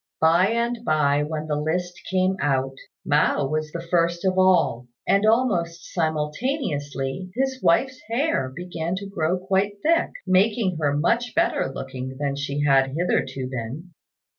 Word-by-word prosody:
By 170 +4 +4
and 235 +2 0
by 145 -6 +2
when 155 +1 -3
the 150 -1 -1
list 175 +4 -1 0.2
came 185 0 +2
out, 135 -1 0 0.3
Mao 145 -1 +2
was 155 +2 -2
the 170 +1 -5
first 170 +1 +1
of 185 -1 +2
all; 185 -10 +3 0.2
and 200 +2 +3
almost 180 -8 +1
simultaneously 155 - -2
his 265 +1 -1
wife's 255 +10 +2
hair 230 - 0
began 170 +3 -4
to 200 +2 -5
grow 180 -3 -1
quite 195 +2 0
thick, 335 +2 +3 0.2
making 190 -1 +2
her 145 -1 +1
much 235 +10 0
better 335 - +1
looking 130 -1 -6
than 140 -1 -1
she 140 +1 -3
had 135 -1 +3
hitherto 135 -6 -1
been. 130 +8 -6
170 Hz, 145 wpm, -24 LUFS, 145-195 Hz, 0.3 s, By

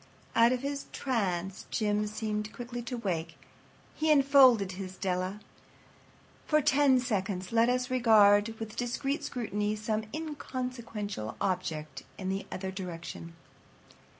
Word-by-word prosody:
Out 230 +1 +6
of 255 -1 0
his 280 0 -3
trance 195 -7 -2
Jim 210 -1 0
seemed 215 0 -3
quickly 245 0 -6
to 240 +1 -5
wake. 165 -7 -3 0.6
He 310 0 -1
enfolded 265 -8 +6
his 185 0 -7
Della. 185 +1 -2 1.1
For 305 - +4
ten 275 -2 +4
seconds 190 -6 -2
let 230 +1 +4
us 250 +1 0
regard 220 -3 +5
with 220 -1 -6
discreet 270 +5 -2
scrutiny 210 -4 -2
some 215 0 -2
inconsequential 250 - -5
object 160 -6 -2 0.2
in 190 -1 -4
the 195 +1 -3
other 190 0 -4
direction. 170 -2 -7
215 Hz, 125 wpm, -30 LUFS, 190-250 Hz, 1.1 s, Out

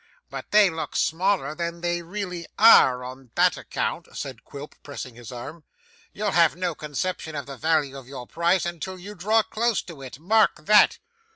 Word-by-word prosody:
'But - - -7
they 210 -3 +5
look 160 0 -6
smaller 175 -3 +1
than 170 +1 -4
they 175 0 -1
really 180 -1 -6
are, 130 - +7
on 130 0 -10
that - - +4
account,' - - -4
said 130 -4 -6
Quilp, 145 +1 -10
pressing 140 -3 -8
his 120 +1 -11
arm. 145 +7 -8 0.5
'You'll 205 0 -2
have 170 -4 +4
no 180 -1 -2
conception 155 +2 -4
of 145 -2 -4
the 140 +1 -8
value 150 -2 0
of 135 -3 -10
your 130 -2 -8
prize 170 +6 +1
until 175 +2 -5
you 195 +3 -9
draw 215 +4 +2
close 230 +1 -1
to 165 -6 -11
it. 130 -1 -9
Mark 215 +8 +2
that. 210 0 +6
170 Hz, 180 wpm, -24 LUFS, 140-185 Hz, 0.5 s, are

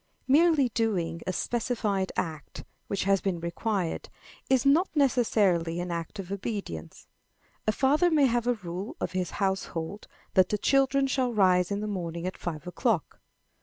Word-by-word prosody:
Merely 295 -1 +4
doing 185 -8 -1
a - - +1
specified 210 -2 -1
act, 155 -5 -4 0.2
which 200 - -1
has 195 0 +2
been 185 -3 -1
required, 175 +1 -2 0.4
is 260 0 +3
not 315 +7 +4
necessarily 205 - +2
an 175 0 -3
act 170 +4 -4
of 195 -1 -7
obedience. 200 - -5 0.6
A - - +5
father 290 +9 +3
may 305 -4 +4
have 240 -1 +1
a 245 - +3
rule 185 -1 -6
of - - -2
his 185 -1 -2
household 190 -1 -2 0.3
that 185 -2 +4
the 210 - 0
children 275 +4 +3
shall 255 -3 0
rise 180 -3 +4
in 200 0 -2
the 215 - -3
morning 170 -4 -4
at 185 - -3
five 155 -4 -5
o'clock. 180 - -1
200 Hz, 160 wpm, -28 LUFS, 175-245 Hz, 0.6 s, A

